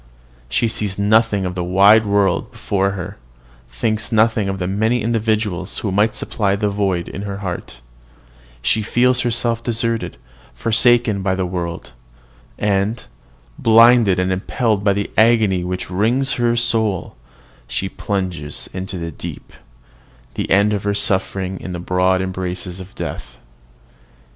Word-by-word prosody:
She 115 - +1
sees 105 -3 -3
nothing 105 -1 +2
of 90 - -3
the 90 -1 -3
wide 100 +5 +5
world 100 -1 +1
before 100 -1 -1
her, 90 -1 -7 0.5
thinks 110 - -2
nothing 110 -2 +2
of 95 - -3
the 90 - -3
many 110 +6 0
individuals 110 -5 -1
who 105 - -2
might 105 +3 +2
supply 100 -3 -1
the 105 0 0
void 95 -4 -1
in 95 - -6
her 100 -1 -5
heart; 90 -8 -6 0.8
she 110 - +2
feels 125 +3 +2
herself 120 -1 0
deserted, 115 -1 -2 0.4
forsaken 115 -2 +3
by 95 -1 0
the 95 -1 -1
world; 85 -2 -5 0.7
and, 105 +2 0 0.5
blinded 115 -3 +6
and 90 +1 0
impelled 105 +2 0
by 100 -1 +3
the 100 0 -3
agony 110 -5 +4
which 90 0 -4
wrings 120 +8 +1
her 120 -1 +1
soul, 110 -5 0 0.5
she 95 - -3
plunges 90 -7 -4
into 95 0 -5
the 85 -1 -5
deep, - - -9 0.8
to - - -3
end 100 +3 +4
her 100 0 -1
sufferings 95 -1 0
in 90 - -6
the 90 - -4
broad 90 +1 +1
embrace 95 -1 -4
of 90 +1 -9
death. - - -6
100 Hz, 140 wpm, -19 LUFS, 95-110 Hz, 0.8 s, blinded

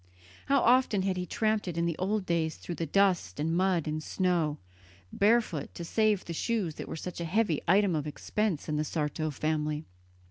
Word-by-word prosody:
How 275 -1 +4
often 240 -5 +4
had 190 -1 0
he 180 0 -3
tramped 215 0 0
it 170 -2 -4
in 170 - +1
the 170 -2 0
old 195 +2 0
days 165 -2 0
through 175 - -6
dust 170 - +1
and 160 +2 0
mud 180 -3 +2
and 155 0 -2
snow, 170 -3 0 0.6
barefoot 205 -8 +1
to 170 - -5
save 215 +1 +1
the 170 - -5
shoes 200 -2 -1
that - - -7
were - - -5
such 175 +2 -6
a - - -2
heavy 180 -3 +1
item 190 0 +4
of 150 -1 -2
expense 190 +2 -2
in 150 -1 -1
the 150 - +1
Sarto 155 0 -2
family. 150 +1 -2
175 Hz, 190 wpm, -29 LUFS, 155-200 Hz, 0.6 s, How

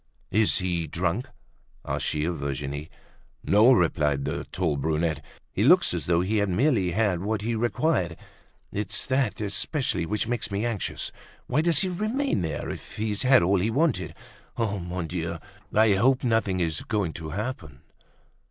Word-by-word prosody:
"Is 110 +1 +3
he 85 -4 -1
drunk?" 90 - -1 0.6
asked - - -1
she 75 0 0
of 85 -2 -2
Virginie. 70 +2 -4 0.5
"No," 105 +6 +6
replied 75 - +2
the - - -3
tall 85 -5 -1
brunette. 80 +1 -1 0.3
"He - - -2
looks - - +5
as - - -3
though 85 -1 +3
he 105 +4 0
had 100 -1 +1
merely 105 -1 +2
had 95 -2 +1
what 105 +1 -1
he 115 +2 -1
required. 115 - 0 0.5
It's 100 0 -2
that 130 -4 0
especially 105 - -1
which 105 +3 -1
makes 120 0 -2
me 100 +2 -1
anxious. 115 -5 -2 0.3
Why 140 +5 +1
does 165 -2 +3
he 190 - +1
remain 215 - -1
there 80 -3 -3
if - - -9
he's 105 -1 -1
had 130 -4 +5
all 95 +2 +3
he 105 +5 +1
wanted? 150 +7 0 0.4
Mon 90 -6 -2
Dieu! 85 0 -3 0.3
I 110 -1 +4
hope 125 +7 +3
nothing 110 -6 +1
is 80 -3 0
going 100 -7 -1
to 80 -1 -7
happen!" 85 - -5
100 Hz, 160 wpm, -26 LUFS, 85-115 Hz, 0.6 s, No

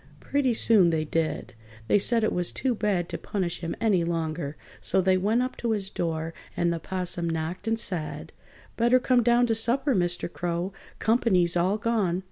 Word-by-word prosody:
Pretty 265 -4 0
soon 210 -6 +5
they 160 -1 0
did. 155 -5 -2 0.3
They 205 - +4
said 230 +3 +2
it 215 - +1
was 180 -1 0
too 260 -2 -1
bad 200 -6 -1
to - - -5
punish 180 -4 -3
him 165 -1 -4
any 205 -6 +2
longer, 160 -3 -3 0.2
so - - +1
they 190 0 +3
went 215 +6 +1
up 255 - -4
to 235 -2 -1
his 200 -2 -3
door, 165 -1 -3 0.2
and 170 0 +1
the 165 - -3
'Possum 180 -1 -3
knocked 165 +5 -4
and 225 0 +1
said: 180 -8 -3 0.4
"Better 240 +2 +4
come 250 -1 +3
down 240 +1 +3
to 230 - +1
supper, 245 +5 +3
Mr. 175 -3 0
Crow. 175 +2 -3 0.2
Comp'ny's 195 -7 +2
all 185 +4 +1
gone!" 210 -6 0
185 Hz, 185 wpm, -26 LUFS, 170-225 Hz, 0.4 s, soon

